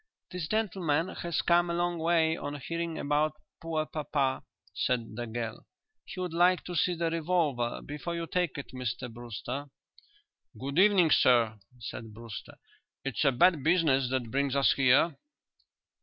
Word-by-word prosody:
"This 180 -4 -4
gentleman 185 -6 0
has 170 -3 -2
come 175 0 +3
a 170 - -1
long 175 0 0
way 160 -1 +2
on 145 -3 -5
hearing 165 +2 -3
about 150 +1 0 0.2
poor 160 -2 -1
papa," 145 -4 -1 0.3
said 115 +1 -1
the 120 +1 -4
girl. 115 0 -5 0.4
"He - - -8
would 180 -2 -3
like 180 +2 +4
to 180 - -6
see 175 +2 +2
the 165 -1 -1
revolver 155 -8 0
before 150 +4 -5
you 170 0 -3
take 175 -2 -1
it, 140 - -7
Mr 125 -1 -4
Brewster." 120 +4 -6 0.9
"Good 140 +5 -1
evening, 190 -5 +5
sir," 115 -5 +4 0.2
said 115 -1 -8
Brewster. 115 -3 -9 0.5
"It's 135 -2 -1
a 140 - +5
bad 165 +4 +4
business 150 -6 +3
that 125 -3 -2
brings 140 0 0
us 140 -1 +4
here." 140 +4 +4
150 Hz, 155 wpm, -29 LUFS, 125-170 Hz, 0.9 s, evening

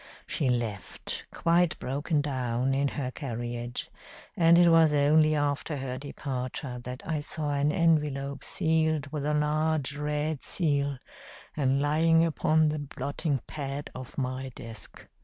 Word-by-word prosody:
She 135 - 0
left, 115 -6 -3
quite 170 0 +2
broken 145 +4 -1
down, 130 -2 -1
in 140 +1 +2
her 135 -2 -3
carriage, 120 -2 -5 0.4
and 170 0 +6
it 175 0 +7
was 165 -2 +5
only 155 +2 +4
after 145 +1 -1
her 130 -1 -4
departure 130 -2 -4
that 125 +1 -7
I 160 -2 -1
saw 150 0 -2
an 145 +1 +2
envelope 150 -4 +1
sealed 160 -3 0
with 150 -2 -2
a 150 - +1
large 150 -1 +1
red 150 0 -2
seal, 145 -5 0 0.6
and 135 -2 +2
lying 165 +3 +4
upon 155 -1 +2
the 150 0 -2
blotting 140 0 -2
pad 145 -1 -5
of 130 -1 -9
my 130 0 -2
desk. 115 -3 -11
145 Hz, 140 wpm, -28 LUFS, 130-155 Hz, 0.6 s, it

